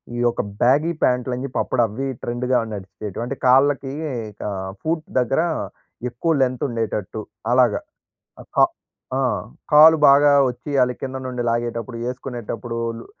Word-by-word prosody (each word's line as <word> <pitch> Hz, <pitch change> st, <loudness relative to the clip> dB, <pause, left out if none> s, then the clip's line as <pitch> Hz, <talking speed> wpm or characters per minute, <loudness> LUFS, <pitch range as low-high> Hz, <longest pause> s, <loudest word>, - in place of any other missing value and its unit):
ఈ -, -, -4 dB
యొక్క 120 Hz, -, +1 dB, 0.2 s
బ్యాగీ 145 Hz, +7 st, +4 dB
ప్యాంట్లు 125 Hz, 0 st, +1 dB
అని 125 Hz, -, -5 dB
చెప్పి 135 Hz, -, -3 dB
అప్పుడు 125 Hz, -, 0 dB
అవ్వి 125 Hz, +6 st, -4 dB, 0.2 s
ట్రెండ్‌గా 125 Hz, +1 st, 0 dB, 0.2 s
నడిచేటివి. 100 Hz, +2 st, -6 dB
అంటే 130 Hz, +3 st, -4 dB
కాళ్ళకి 135 Hz, +1 st, +4 dB, 0.6 s
ఆహ్, 95 Hz, -1 st, -4 dB
ఫూట్ 160 Hz, 0 st, -1 dB, 0.2 s
దగ్గర 125 Hz, +5 st, +1 dB, 0.7 s
ఎక్కువ 125 Hz, +8 st, -1 dB
లెంగ్త్ 130 Hz, -1 st, +1 dB
ఉండేటట్టు 110 Hz, -2 st, -3 dB, 0.3 s
అలాగ. 125 Hz, -3 st, +4 dB, 0.7 s
అ -, -, -12 dB
కా -, -, +7 dB, 0.5 s
ఆ! -, -, 0 dB, 0.5 s
కాలు 155 Hz, +2 st, +9 dB
బాగా 145 Hz, +1 st, +6 dB, 0.2 s
వచ్చియ్యాలి 125 Hz, 0 st, 0 dB
కింద 130 Hz, 0 st, -4 dB
నుండి 125 Hz, -1 st, -3 dB
లాగేటప్పుడు 115 Hz, +1 st, -2 dB
ఏసుకునేటప్పుడు 120 Hz, -2 st, -5 dB, 0.2 s
లు -, -, -11 dB
125 Hz, 135 wpm, -22 LUFS, 115-135 Hz, 0.7 s, కాలు